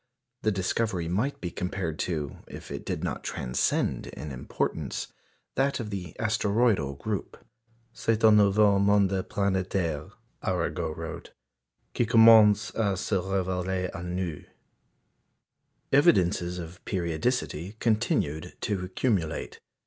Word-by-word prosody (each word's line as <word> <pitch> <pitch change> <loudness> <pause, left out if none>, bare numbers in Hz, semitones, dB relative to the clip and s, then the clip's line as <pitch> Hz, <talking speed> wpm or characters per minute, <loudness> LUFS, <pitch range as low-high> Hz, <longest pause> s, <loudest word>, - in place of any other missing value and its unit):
The 110 - +2
discovery 95 -1 -1
might 110 +12 -1
be 90 - -3
compared 90 -3 -3
to, 75 -5 -2
if - - -10
it - - -6
did - - -2
not - - -3
transcend 60 0 -1
in 75 - -7
importance, 65 - -3 0.4
that 135 +1 +1
of 110 -3 -5
the 90 -5 -6
asteroidal 105 - +1
group. 100 +6 -4 0.6
"C'est 115 -1 0
un 110 -1 +8
nouveau 100 0 +5
monde 100 -1 +4 0.2
planétaire," 95 -6 -1 0.3
Arago 80 -2 -1
wrote, - - -7 0.6
"qui 120 - +1
commence 110 -2 +7
à 100 -4 0
se 100 - -3
révéler 95 -1 -1
à 85 - -7
nous." 90 -3 -3 1.5
Evidences 90 - +3
of 85 +2 -8
periodicity 90 0 -2
continued 105 -9 0
to 100 -3 -2
accumulate. 90 -4 -1
95 Hz, 115 wpm, -27 LUFS, 85-110 Hz, 1.5 s, un